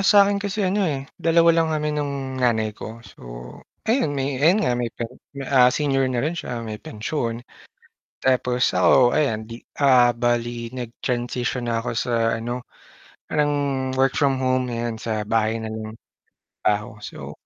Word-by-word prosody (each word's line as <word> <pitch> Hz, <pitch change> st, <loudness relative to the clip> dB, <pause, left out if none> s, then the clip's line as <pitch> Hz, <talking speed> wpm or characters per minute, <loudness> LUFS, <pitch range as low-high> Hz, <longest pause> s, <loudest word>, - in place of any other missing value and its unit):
sa'kin 200 Hz, 0 st, +5 dB
kasi 200 Hz, 0 st, -1 dB
ano, 195 Hz, +3 st, +1 dB
eh, 135 Hz, -2 st, -3 dB, 0.2 s
dalawa 165 Hz, 0 st, +5 dB
lang 165 Hz, -1 st, +2 dB
kami 150 Hz, -1 st, -1 dB
ng 135 Hz, -2 st, -4 dB
nanay 110 Hz, -3 st, +2 dB
ko 115 Hz, +2 st, -9 dB
so -, -, -16 dB, 0.6 s
ayun, 225 Hz, -, +1 dB
eh, 135 Hz, -1 st, -2 dB
ayun 180 Hz, +8 st, +4 dB
nga -, -, +2 dB
may, 120 Hz, -1 st, -1 dB
per 115 Hz, -, -6 dB, 0.5 s
ah, 125 Hz, -2 st, +7 dB
senior 135 Hz, -1 st, +1 dB
na 125 Hz, +1 st, -1 dB
rin 160 Hz, -, 0 dB
siya 120 Hz, -8 st, -5 dB
may 110 Hz, -1 st, -6 dB
pensyon. 120 Hz, -3 st, -4 dB, 0.8 s
Tapos 125 Hz, -1 st, +2 dB
ako, 125 Hz, -2 st, +5 dB
ayan 125 Hz, -8 st, +1 dB
'di 115 Hz, +2 st, -9 dB, 0.2 s
ah, 125 Hz, -3 st, +6 dB
bale 120 Hz, 0 st, -1 dB
nag 120 Hz, -2 st, -6 dB
transition 120 Hz, 0 st, -2 dB
na 115 Hz, -1 st, 0 dB
ako -, -, -2 dB
sa 115 Hz, -2 st, +1 dB
ano, 120 Hz, +2 st, -4 dB, 0.7 s
parang 150 Hz, -1 st, +1 dB, 0.4 s
work 135 Hz, 0 st, +2 dB
from 135 Hz, -3 st, +2 dB
home, 130 Hz, -1 st, +1 dB
ayan 115 Hz, -1 st, -2 dB
sa 110 Hz, -2 st, -3 dB
bahay 115 Hz, 0 st, +1 dB
na 110 Hz, -, -4 dB
lang 110 Hz, 0 st, -6 dB, 0.5 s
nagtrabaho 105 Hz, +1 st, -2 dB
so -, -, -8 dB
125 Hz, 160 wpm, -23 LUFS, 115-145 Hz, 0.8 s, ah